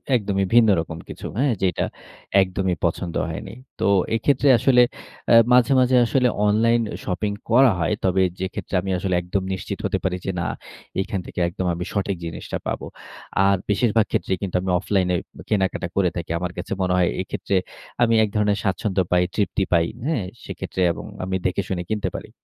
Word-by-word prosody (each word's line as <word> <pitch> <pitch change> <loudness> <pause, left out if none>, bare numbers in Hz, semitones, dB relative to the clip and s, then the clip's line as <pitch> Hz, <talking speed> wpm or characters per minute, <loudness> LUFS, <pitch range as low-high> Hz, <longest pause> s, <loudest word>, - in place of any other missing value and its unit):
একদমই 100 -4 0
ভিন্ন 115 -3 +7
রকম 80 0 -7
কিছু, - - -8
হ্যাঁ? 135 +1 +2
যেইটা 90 -3 +1 0.6
একদমই 95 -1 0
পছন্দ 85 0 -2
হয়নি। - - -6 0.3
তো - - +2 0.3
এইক্ষেত্রে 140 +5 +2
আসলে 125 0 +5 0.5
অ্যা 115 - +8 0.2
মাঝে, 125 +1 +5
মাঝে 125 0 +4
আসলে 125 +1 +2 0.2
অনলাইন 115 +3 +3 0.2
শপিং 100 +3 -1 0.2
করা 125 0 +6
হয়। 85 +4 +1
তবে 95 0 +2 0.2
যেক্ষেত্রে 95 +1 -4
আমি 95 +1 -3
আসলে 95 -1 0
একদম 95 +2 -2
নিশ্চিত 95 - -5
হতে - - +1
পারি 90 -1 +1
যে, 95 - 0
না, - - -2 0.6
এখান 100 0 -3
থেকে - - -6
একদম 90 +2 -4
আমি 90 +1 -4
সঠিক 100 -2 -1
জিনিসটা 85 - -5
পাবো। - - -3 0.6
আর 100 -1 +4
বেশিরভাগ 110 +1 +3
ক্ষেত্রেই 95 - 0
কিন্তু 95 -3 -4
আমি 95 -1 -2
অফলাইনেই 90 -2 +1 0.2
বে - - -9
কেনাকাটা 95 -4 0
করে 90 -3 +3
থাকি। 85 -1 -4
আমার 90 0 -3
কাছে - - -4
মনে 90 -1 +1
হয়, 90 -1 +3
এইক্ষেত্রে 95 +1 -3 0.5
আমি 115 -1 +3
এক 105 - 0
ধরনের 105 -1 +2
স্বাচ্ছন্দ্য 95 0 0
পাই, 90 0 +4
তৃপ্তি 100 -1 0
পাই, 85 -1 +4 0.2
হ্যাঁ? 135 - 0 0.2
সেইক্ষেত্রে 95 - -5
এবং - - -8 0.2
আমি 95 0 -2
দেখেশুনে 90 -1 -2
কিনতে 105 -2 -1
পারি। - - -7
95 Hz, 175 wpm, -23 LUFS, 90-110 Hz, 0.6 s, অ্যা